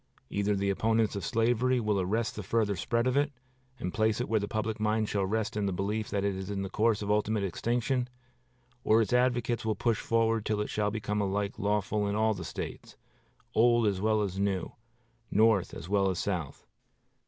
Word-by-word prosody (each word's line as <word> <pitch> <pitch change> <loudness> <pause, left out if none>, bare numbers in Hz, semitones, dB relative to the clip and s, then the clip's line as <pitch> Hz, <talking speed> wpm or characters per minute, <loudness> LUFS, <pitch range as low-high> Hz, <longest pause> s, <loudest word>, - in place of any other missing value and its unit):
Either 100 0 +1
the 100 0 0
opponents 110 +1 +1
of 100 - -4
slavery 120 +3 +2
will 105 -4 +1
arrest 110 +5 -1
the 105 - -4
further 105 0 0
spread 115 +7 0
of 130 0 +1
it, 145 +1 +2 0.5
and 90 - -4
place 110 0 +1
it 125 - -1
where 110 -1 +2
the 100 - -3
public 110 +1 -2
mind 110 0 +1
shall 100 -2 0
rest 110 +2 -1
in 105 -1 0
the - - 0
belief 105 +4 -2
that 100 -2 -1
it 100 -1 0
is 95 +1 -6
in 100 -1 -2
the 95 - -6
course 110 -1 +1
of 100 - -1
ultimate 105 0 +1
extinction, 120 +6 -1 0.7
or 110 +1 +4
its 105 - -3
advocates 125 -1 +1
will 110 -1 0
push 115 +2 0
it - - -14
forward 115 -1 +2
till 105 -1 -1
it 105 - -2
shall 105 -1 0
become 105 -1 -2
alike 100 +1 -2
lawful 105 0 0
in 100 - -1
all 110 +1 +2
the 90 -4 -6
States, - - -7 0.6
old 120 0 +4
as 100 -2 0
well 110 0 +2
as 95 -1 -3
new, 100 -3 -1 0.6
North 110 -3 +3
as - - -8
well 100 0 +2
as 95 - -2
South." 90 -7 -3
105 Hz, 210 wpm, -29 LUFS, 100-115 Hz, 0.7 s, or